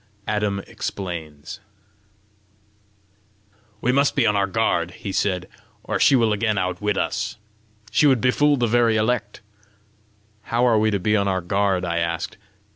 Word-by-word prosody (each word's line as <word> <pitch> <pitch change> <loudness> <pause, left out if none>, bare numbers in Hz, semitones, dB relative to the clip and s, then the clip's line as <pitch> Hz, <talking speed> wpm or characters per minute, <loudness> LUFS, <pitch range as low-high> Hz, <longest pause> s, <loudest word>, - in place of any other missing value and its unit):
ADAM 105 -2 -1
EXPLAINS 80 -6 -6 2.2
"We 125 - +2
must 140 +2 +2
be 140 - +3
on 105 - +2
our 100 -1 +1
guard," 95 -5 0
he 100 - -6
said, 90 -2 -1 0.4
"or - - -2
she 140 - +5
will 115 -4 +3
again 105 0 0
outwit 95 +2 -1
us. 105 +2 -2 0.5
She 150 - +4
would 130 -3 +4
befool 145 +4 +3
the 120 - +1
very 115 -1 +3
elect!" 110 -1 -1 1.0
"How 120 +2 +1
are 115 -3 +4
we 110 0 +2
to 105 - +1
be 105 +4 +1
on 100 -1 +1
our 95 -1 0
guard?" 95 0 0
I 85 -1 -1
asked. 85 0 -3
105 Hz, 150 wpm, -22 LUFS, 95-115 Hz, 2.2 s, she